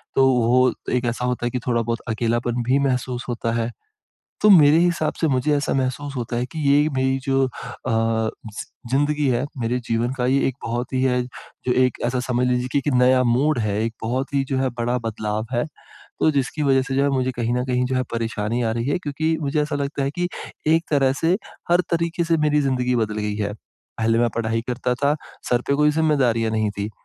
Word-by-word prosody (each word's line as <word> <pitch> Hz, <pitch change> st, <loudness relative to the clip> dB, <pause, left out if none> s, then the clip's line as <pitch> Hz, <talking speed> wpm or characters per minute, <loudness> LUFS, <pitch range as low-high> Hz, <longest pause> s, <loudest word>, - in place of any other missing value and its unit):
तो 135 Hz, 0 st, +5 dB
वो 125 Hz, +2 st, +3 dB, 0.2 s
एक 125 Hz, 0 st, 0 dB
ऐसा 120 Hz, +1 st, -1 dB
होता 125 Hz, -1 st, -1 dB
है -, -, +1 dB
कि 125 Hz, -, -2 dB
थोड़ा 120 Hz, -1 st, +2 dB
बहुत 115 Hz, 0 st, -2 dB
अकेलापन 120 Hz, +2 st, 0 dB
भी 135 Hz, +2 st, +3 dB
महसूस 125 Hz, -1 st, -2 dB
होता 115 Hz, -1 st, -2 dB
है। 115 Hz, +1 st, -2 dB, 0.7 s
तो 210 Hz, -, +6 dB
मेरे 155 Hz, -3 st, +7 dB
हिसाब 170 Hz, -3 st, +1 dB
से 160 Hz, -, +3 dB
मुझे 140 Hz, +2 st, +1 dB
ऐसा 145 Hz, -, 0 dB
महसूस 135 Hz, +2 st, -2 dB
होता 120 Hz, -1 st, -3 dB
है 125 Hz, -, 0 dB
कि 160 Hz, -, -5 dB
ये 145 Hz, +2 st, +4 dB
मेरी 130 Hz, 0 st, +2 dB
जो 135 Hz, -1 st, +2 dB
अ, -, -, -3 dB, 0.4 s
ज़ि 110 Hz, -1 st, -1 dB, 0.3 s
ज़िंदगी 145 Hz, +1 st, +1 dB
है 125 Hz, +2 st, +1 dB
मेरे 120 Hz, +2 st, 0 dB
जीवन 115 Hz, +2 st, 0 dB
का 125 Hz, -, 0 dB
ये 135 Hz, +2 st, +3 dB
एक 130 Hz, -, -3 dB
बहुत 120 Hz, +3 st, -3 dB
ही 130 Hz, -, +1 dB
है, 125 Hz, -1 st, +2 dB
जो 125 Hz, 0 st, -7 dB
एक 125 Hz, -, 0 dB
ऐसा 125 Hz, +1 st, 0 dB
समझ 125 Hz, 0 st, +1 dB
लीजिए 125 Hz, 0 st, 0 dB
कि -, -, +3 dB
एक 140 Hz, -1 st, -1 dB
नया 125 Hz, 0 st, +4 dB
मोड़ 130 Hz, +4 st, +2 dB
है, 105 Hz, -1 st, 0 dB
एक 115 Hz, 0 st, -2 dB
बहुत 130 Hz, +5 st, -2 dB
ही 135 Hz, -1 st, +2 dB
जो 135 Hz, -, 0 dB
है 130 Hz, -1 st, +1 dB
बड़ा 120 Hz, +1 st, 0 dB
बदलाव 110 Hz, 0 st, -2 dB
है, 120 Hz, +4 st, +1 dB, 0.5 s
तो 160 Hz, -, +4 dB
जिसकी 140 Hz, +2 st, -1 dB
वजह 135 Hz, -1 st, +4 dB
से 135 Hz, 0 st, -3 dB
जो 140 Hz, -, +3 dB
है 140 Hz, -, +2 dB
मुझे 130 Hz, -1 st, 0 dB
कहीं 120 Hz, -1 st, -2 dB
न 125 Hz, -, 0 dB
कहीं 125 Hz, 0 st, 0 dB
जो 130 Hz, 0 st, -1 dB
है 130 Hz, -, +1 dB
परेशानी 115 Hz, 0 st, -2 dB
आ 110 Hz, -, +1 dB
रही 115 Hz, +3 st, -2 dB
है, 145 Hz, -, +1 dB
क्योंकि 155 Hz, +1 st, -1 dB
मुझे 150 Hz, +1 st, 0 dB
ऐसा 150 Hz, -1 st, -3 dB
लगता 140 Hz, 0 st, -2 dB
है 135 Hz, -, -1 dB
कि 175 Hz, +3 st, -1 dB, 0.4 s
एक 165 Hz, +1 st, +4 dB
तरह 135 Hz, -2 st, +3 dB
से 175 Hz, +4 st, +3 dB, 0.3 s
हर 175 Hz, +1 st, +5 dB
तरीके 170 Hz, +1 st, 0 dB
से 165 Hz, -1 st, +2 dB
मेरी 150 Hz, -1 st, +2 dB
ज़िंदगी 125 Hz, -2 st, 0 dB
बदल 110 Hz, -2 st, -1 dB
गई 105 Hz, 0 st, -2 dB
है। 105 Hz, -1 st, -2 dB, 0.5 s
पहले 115 Hz, +1 st, +2 dB
मैं 120 Hz, -1 st, +3 dB
पढ़ाई 115 Hz, 0 st, 0 dB
करता 125 Hz, 0 st, -1 dB
था, 140 Hz, +3 st, +1 dB, 0.3 s
सर 120 Hz, 0 st, +2 dB
पे 140 Hz, -, +2 dB
कोई 150 Hz, +1 st, +4 dB
ज़िम्मेदारियाँ 130 Hz, -8 st, +2 dB
नहीं 110 Hz, -1 st, +1 dB
थी, 100 Hz, +2 st, -2 dB
125 Hz, 225 wpm, -22 LUFS, 120-140 Hz, 0.7 s, मेरे